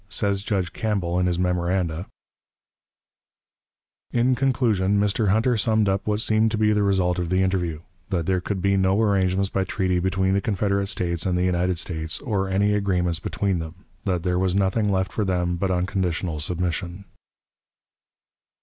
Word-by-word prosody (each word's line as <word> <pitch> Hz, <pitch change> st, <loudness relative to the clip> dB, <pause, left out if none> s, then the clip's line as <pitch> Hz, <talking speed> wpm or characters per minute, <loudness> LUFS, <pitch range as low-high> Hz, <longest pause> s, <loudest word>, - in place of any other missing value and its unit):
Says 100 Hz, -2 st, 0 dB
Judge 95 Hz, -4 st, -2 dB
Campbell, 95 Hz, -6 st, -1 dB
in 90 Hz, -, +2 dB
his 90 Hz, -1 st, 0 dB
memoranda: 90 Hz, -1 st, -1 dB, 2.0 s
"In 120 Hz, +2 st, +2 dB
conclusion, 115 Hz, -7 st, +1 dB
Mr. 105 Hz, +1 st, +1 dB
Hunter 110 Hz, +5 st, +2 dB
summed 110 Hz, +1 st, +2 dB
up 95 Hz, +1 st, -1 dB
what 105 Hz, 0 st, +1 dB
seemed 110 Hz, 0 st, +3 dB
to 110 Hz, -, -2 dB
be 105 Hz, 0 st, +3 dB
the 105 Hz, -, +1 dB
result 95 Hz, -3 st, +1 dB
of 85 Hz, -2 st, -2 dB
the 95 Hz, +1 st, +2 dB
interview: 90 Hz, -5 st, -1 dB, 0.3 s
that 90 Hz, -4 st, -1 dB
there 95 Hz, 0 st, +1 dB
could 95 Hz, 0 st, -3 dB
be 100 Hz, 0 st, +3 dB
no 95 Hz, +1 st, +2 dB
arrangements 95 Hz, -2 st, +1 dB
by 95 Hz, -, 0 dB
treaty 90 Hz, -1 st, 0 dB
between 95 Hz, +1 st, +1 dB
the 100 Hz, -, +1 dB
Confederate 100 Hz, -1 st, 0 dB
States 85 Hz, -3 st, -1 dB
and 90 Hz, -1 st, +1 dB
the 90 Hz, -, +1 dB
United 90 Hz, 0 st, +1 dB
States, 80 Hz, -2 st, -3 dB
or 100 Hz, -7 st, -1 dB
any 100 Hz, +2 st, +2 dB
agreements 90 Hz, -5 st, 0 dB
between 95 Hz, 0 st, -1 dB
them; 80 Hz, +4 st, -9 dB, 0.2 s
that 90 Hz, -4 st, -1 dB
there 90 Hz, -1 st, 0 dB
was 95 Hz, -1 st, +1 dB
nothing 100 Hz, +2 st, +1 dB
left 95 Hz, -1 st, 0 dB
for 110 Hz, -, 0 dB
them 90 Hz, -2 st, 0 dB
but 95 Hz, +2 st, -1 dB
unconditional 90 Hz, -3 st, -1 dB
submission." 90 Hz, +3 st, -3 dB
95 Hz, 170 wpm, -24 LUFS, 90-100 Hz, 2.0 s, seemed